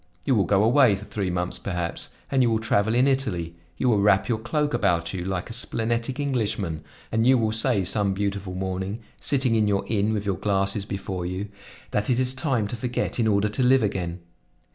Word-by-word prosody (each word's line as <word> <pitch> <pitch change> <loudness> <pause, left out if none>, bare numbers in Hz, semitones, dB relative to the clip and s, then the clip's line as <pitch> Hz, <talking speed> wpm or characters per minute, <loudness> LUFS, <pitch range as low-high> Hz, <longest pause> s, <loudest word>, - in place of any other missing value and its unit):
You 135 - +2
will 100 -6 +3
go 100 +2 +3
away 120 -2 +5
for 100 +2 -9
three 100 -4 -3
months 90 0 -2
perhaps, 85 -3 -3 0.2
and 135 -1 +3
you 120 - +4
will 110 - +2
travel 110 0 +1
in 125 +3 +4
Italy; 105 -12 0 0.2
you 130 - 0
will 110 -4 +3
wrap 100 -1 +3
your 115 -3 0
cloak 145 +6 -1
about 85 +1 +1
you, 90 -2 -3
like 95 -1 -3
a - - -7
splenetic 115 +2 -2
Englishman, 105 - -1 0.3
and 115 +2 +2
you 130 0 +6
will 110 -2 +1
say 110 -2 +1
some 100 +1 +1
beautiful 100 -2 -3
morning, 95 +3 -3 0.2
sitting 130 -4 +1
in 110 -2 +3
your 100 -1 +1
inn 105 -1 0
with 105 -2 -2
your 100 -3 -1
glasses 100 0 0
before 95 -3 -4
you, 95 +3 -4 0.4
that 105 +3 0
it 125 -1 +2
is 130 0 +2
time 130 -7 0
to - - -3
forget 120 +1 -2
in 115 - +2
order 105 -1 +2
to 105 - -2
live 130 0 +4
again. 90 -4 -2
105 Hz, 210 wpm, -25 LUFS, 95-120 Hz, 0.4 s, you